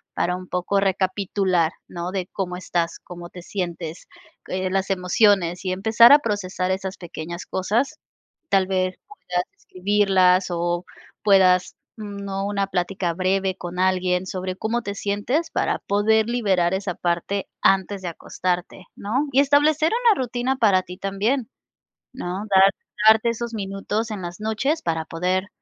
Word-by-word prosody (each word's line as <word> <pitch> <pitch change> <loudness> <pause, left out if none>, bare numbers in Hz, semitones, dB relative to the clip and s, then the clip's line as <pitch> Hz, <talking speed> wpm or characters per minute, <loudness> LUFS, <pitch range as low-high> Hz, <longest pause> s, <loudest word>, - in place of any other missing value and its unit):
para 180 - 0
un 185 0 -8
poco 180 +2 0
recapitular, 190 -3 +1 0.2
¿no?, 175 +1 -5
de 185 -2 -3
cómo 180 -2 -3
estás, 170 -2 -2
cómo 175 -1 -9
te 180 - -10
sientes, 175 -3 -5 0.4
eh, 185 0 -2
las 195 0 0
emociones, 180 -1 +2
y 185 - -1
empezar 220 +5 +6
a 290 - +9
procesar 190 -6 -2
esas 190 0 -3
pequeñas 170 0 -7
cosas, 235 +11 -1 0.5
tal 195 -1 +3
vez 185 -1 0
puedas 180 - -3
escribirlas 190 -1 +2
o 175 0 -1 0.4
puedas, 185 -3 +4 0.2
¿no?, 200 -2 -5
una 200 -1 -1
plática 180 -1 -1
breve 190 +1 0
con 180 -1 -7
alguien 185 -1 +1
sobre 185 0 -4
cómo 230 +4 -1
te 200 -3 -4
sientes 205 +11 -1
para - - 0
poder 215 +2 +3
liberar 195 -7 +1
esa 190 -2 -2
parte 175 +3 -2
antes 195 +1 +2
de 180 - -3
acostarte, 180 +2 -4
¿no? 255 +9 -1
Y 265 - +3
establecer 295 +3 +3
una 440 - +4
rutina 250 +1 -1
para 200 -6 +4
ti 180 0 -10
también, 210 +6 -1 0.6
¿no?, 190 -5 -4
dar 190 +1 +7 0.4
darte 220 +1 +6
esos 235 0 -4
minutos 205 +2 -3
en 205 -3 -5
las 175 0 -6
noches 220 +9 0
para 160 -1 -1
poder, 185 +3 -1
190 Hz, 150 wpm, -23 LUFS, 180-210 Hz, 0.6 s, a